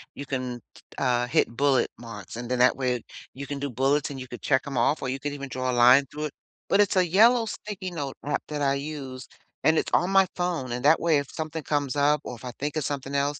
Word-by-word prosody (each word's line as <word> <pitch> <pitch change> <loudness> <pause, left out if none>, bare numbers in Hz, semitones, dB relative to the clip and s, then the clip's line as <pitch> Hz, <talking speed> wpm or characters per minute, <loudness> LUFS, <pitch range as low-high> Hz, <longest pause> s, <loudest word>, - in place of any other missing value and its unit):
you 140 - -7
can, 125 -3 -4
t - - -17 0.2
uh, 125 -2 +1
hit 125 - +2
bullet 135 +2 +2
marks. 115 -3 -9
And 120 0 -6
then 125 -1 0
that 125 +1 +5
way 125 -3 -1 0.3
you 140 +1 -7
can 140 0 -5
do 140 0 -3
bullets 135 +3 +1
and 140 -2 -7
you 130 - -7
could 120 0 -9
check 135 -2 +1
'em 140 -3 -4
off 130 +6 +2
or 130 - -2
you 135 +1 -3
could 145 +1 -4
even 140 -1 -6
draw 130 0 -2
a - - -2
line 125 +3 +6
through 150 +3 -6
it. 150 - -5 0.4
But - - +3
it's 205 -2 +3
a 185 -1 +4
yellow 225 +7 +5
sticky 205 -3 -6
note 145 -6 -4
app 150 - -1
that 150 -1 -4
I 140 -1 +2
use, 140 -3 -6 0.4
and 160 0 +4
it's - - 0
on 175 - +3
my 195 -1 +5
phone 175 -8 -2
and 125 +1 -3
that 155 +3 +6
way 165 -3 +3
if 140 - -6
something 160 0 -5
comes 145 -2 -1
up 145 0 +3
or 125 - -6
if 120 - -12
I 125 - -4
think 145 +2 -2
of 155 - -1
something 140 -1 -4
else, 145 +1 0
140 Hz, 265 wpm, -26 LUFS, 130-150 Hz, 0.4 s, line